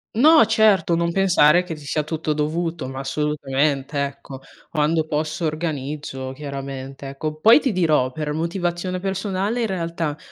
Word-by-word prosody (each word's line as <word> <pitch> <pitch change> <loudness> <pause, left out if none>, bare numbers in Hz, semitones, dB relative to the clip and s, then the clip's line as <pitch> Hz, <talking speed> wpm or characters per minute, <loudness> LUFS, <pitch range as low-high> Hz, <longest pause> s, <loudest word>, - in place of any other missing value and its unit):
No, 310 +6 +7
certo. 210 -6 +3
Non 170 0 0
pensare 180 -3 +4
che 170 -3 -6
ti 150 -1 -13
sia 150 +2 0
tutto 155 0 -2
dovuto, 160 +1 -2
ma 130 0 -6
assolutamente 140 0 -1
ecco. 140 -1 -7 0.3
Quando 155 +1 +1
posso 155 +2 -2
organizzo, 150 -4 -4
chiaramente. 135 -1 -7
Ecco, 150 +3 -4
poi 225 - +7
ti 270 - 0
dirò 155 -9 +2
per 150 +2 -4
motivazione 175 +2 -2
personale 195 +4 -2
in 230 - +1
realtà 165 -5 -3
155 Hz, 145 wpm, -22 LUFS, 145-180 Hz, 0.3 s, No